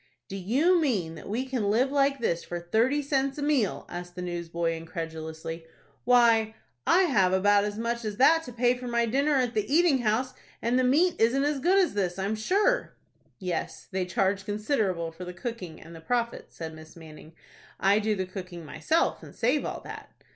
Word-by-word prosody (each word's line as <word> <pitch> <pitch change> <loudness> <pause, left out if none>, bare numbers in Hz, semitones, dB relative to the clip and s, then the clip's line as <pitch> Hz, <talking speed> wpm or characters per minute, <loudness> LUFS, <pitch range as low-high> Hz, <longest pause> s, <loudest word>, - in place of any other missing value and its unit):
"Do - - -7
you 275 - +2
mean 200 - 0
that 165 - -10
we 240 +5 -1
can 250 -6 -1
live 250 +6 +2
like 280 -1 +2
this 175 -9 -1
for 175 - -5
thirty 230 +12 +1
cents 275 -1 0
a 290 - -3
meal?" 280 -9 +1
asked 175 0 -8
the 180 - -5
newsboy, 170 -1 -2
incredulously. 160 0 -6 0.4
"Why, 230 -3 +4 0.3
I 375 - +5
have 195 - +3
about 205 +2 +4
as 210 0 -4
much 235 +1 -2
as 210 -2 -4
that 325 +5 +5
to 250 - -8
pay 245 +1 +2
for 250 0 -7
my 235 -1 +1
dinner 280 +6 +1
at 250 -3 +1
the 215 +4 -2
eating 320 -3 +4
house, 240 +3 0 0.3
and 240 +3 +1
the - - +2
meat 320 +8 +3
isn't 245 +5 +3
as 290 -1 0
good 360 +8 +3
as 375 -3 +3
this, 190 -3 -1
I 190 - -2
am 210 +2 -1
sure." 405 - +1 0.4
"Yes, 180 -3 -4
they 185 -1 -1
charge 195 +2 0
considerable 205 - -1
for 165 +3 -9
the 180 0 -7
cooking 180 -5 -6
and 165 +1 -12
the 165 - -11
profits," 235 +5 -2
said 160 -1 -6
Miss 155 0 -13
Manning. 160 -1 -13 0.5
"I 200 +2 +4
do 215 0 0
the 190 -1 -2
cooking 180 -3 -8
myself, 315 - 0
and - - -13
save 255 +6 +1
all - - -4
that." - - -9
220 Hz, 200 wpm, -27 LUFS, 180-265 Hz, 0.5 s, I